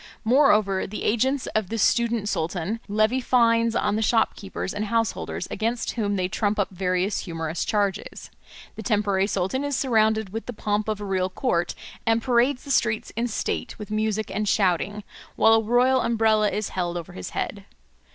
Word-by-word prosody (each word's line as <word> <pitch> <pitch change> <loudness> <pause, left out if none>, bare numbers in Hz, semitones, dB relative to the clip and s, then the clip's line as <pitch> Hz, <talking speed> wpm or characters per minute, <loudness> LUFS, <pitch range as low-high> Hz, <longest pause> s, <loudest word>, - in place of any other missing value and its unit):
Moreover, 215 -6 +3
the 210 - -6
agents 260 +4 +1
of 215 -4 0
the 225 - -2
student 230 0 +2
sultan 175 +4 -2
levy 215 +5 +1
fines 230 -2 +3
on 205 -2 +1
the - - 0
shopkeepers 200 -4 0
and 210 +1 -2
householders, 225 -4 -2
against 230 +2 -1
whom 205 -3 -1
they 185 -2 0
trump 205 +2 -1
up 200 -2 0
various 185 +1 0
humorous 165 -2 -3
charges. 205 -2 -2 0.4
The - - -7
temporary 200 -3 +1
sultan 200 +7 -1
is 285 -1 -1
surrounded 220 -5 +2
with 225 +4 -6
the 245 - -4
pomp 210 0 -1
of 215 -1 -2
a - - -4
real 190 -1 0
court, 180 -3 -1 0.3
and 225 0 +2
parades 250 +2 +2
the 280 - -5
streets 225 -4 +1
in 235 +2 0
state 225 - -3
with 210 -1 -8
music 215 0 -1
and 210 +1 -1
shouting, 200 +2 +1 0.3
while 225 - +5
a 225 - +5
royal 250 +3 +3
umbrella 220 -2 +2
is 210 0 -3
held 175 -1 -2
over 170 - -7
his 90 - -6
head. - - -3
215 Hz, 175 wpm, -24 LUFS, 195-230 Hz, 0.4 s, while